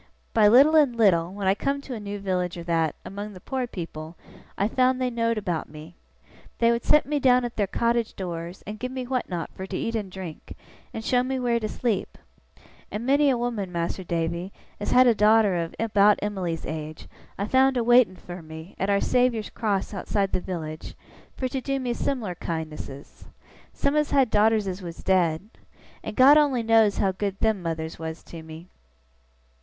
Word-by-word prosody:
By 215 -2 +5
little 275 +8 +6
and 285 -6 +4
little, 180 -7 +3
when 200 0 -5
I 190 - +4
come 275 +7 -1
to 275 - -7
a 230 - -5
new 205 0 -5
village 180 -3 -2
or 170 - -6
that, 165 -3 0
among 205 +2 -6
the 185 - -11
poor 260 +5 -3
people, 165 -5 -7 0.4
I 200 - +2
found 255 +2 +2
they 255 -1 0
know'd 230 -1 0
about 175 -7 -3
me. 155 +3 -11 0.6
They 235 0 +4
would 235 0 -1
set 300 - +4
me 295 +1 -1
down 250 -2 +4
at 240 - -6
their 205 -2 0
cottage 235 +2 0
doors, 175 -1 -6
and 210 +1 -7
give 255 0 -4
me 260 -1 -4
what 255 0 -2
not 175 -3 -4
fur 190 - -7
to 185 - -4
eat 230 - -2
and 210 -4 -3
drink, 180 -4 -9 0.3
and 225 - -7
show 250 -1 +3
me 260 +1 -2
where 240 -2 +1
to 215 -1 -3
sleep; 225 -5 -2 0.7
and 215 +3 -5
many 285 +2 +4
a 255 - +2
woman, 230 -6 -3
Mas'r 170 +2 -3
Davy, 170 +2 -2 0.3
as 205 - -3
has - - +2
had 255 - +8
a 240 - +6
daughter 210 -2 +4
of 170 -1 -3
about 210 -2 +4
Em'ly's 185 -5 -3
age, 155 0 -6 0.3
I've 200 +2 -3
found 265 0 +4
a 240 - +1
waiting 240 -5 +5
fur 175 0 -9
me, 160 +3 -10
at 195 - 0
Our 200 0 +2
Saviour's 245 -4 +1
Cross 210 -3 -2
outside 195 0 -1
the - - -1
village, 160 -4 -6 0.4
fur 260 - -1
to 265 +1 -3
do 275 +1 -2
me 250 -2 -2
sim'lar 235 -7 -2
kindnesses. 155 -5 -7 0.5
Some 280 - 0
has 300 -1 +1
had 265 -4 +3
daughters 215 0 +3
as 190 +1 -4
was 170 -2 -8
dead. 180 -1 +1 0.5
And 210 - -6
God 280 +4 +7
only 270 -5 +2
knows 225 -3 +4
how 195 - +2
good 195 +1 -4
them 220 -3 +1
mothers 160 -2 -4
was 160 0 -6
to 165 - -10
me! 160 +2 -11
205 Hz, 205 wpm, -25 LUFS, 175-245 Hz, 0.7 s, had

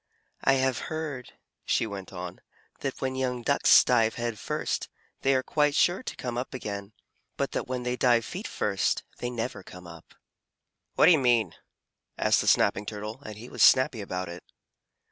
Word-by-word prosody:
"I 135 - +5
have 130 -2 +1
heard," 155 -5 -5 0.3
she - - +1
went 100 -3 -7
on, 90 -1 -7 0.4
"that 135 -2 -4
when 130 -1 -1
young 125 -2 -2
Ducks - - +6
dive 115 0 +2
head 120 -3 -3
first, - - -3 0.3
they 135 0 +3
are 130 - +1
quite 150 0 +1
sure 175 +5 +3
to - - -6
come 120 -1 -4
up 130 +1 -5
again, 100 -3 -6 0.4
but - - -1
that - - -3
when 125 -1 -3
they 125 0 -2
dive 120 -3 +3
feet 195 +5 -6
first, 100 -2 0 0.2
they 120 - -3
never 120 -3 -4
come 90 -1 -12
up." 85 -1 -13 0.8
"What - - +5
do - - +8
you 160 - +5
mean?" 120 - +2 0.6
asked - - +3
the - - -4
Snapping 105 +1 +3
Turtle, 105 +4 -6
and 110 -6 -9
he 115 +3 -10
was - - -6
snappy 130 -3 +5
about 95 -2 -4
it. 85 0 -9
120 Hz, 185 wpm, -27 LUFS, 105-130 Hz, 0.8 s, do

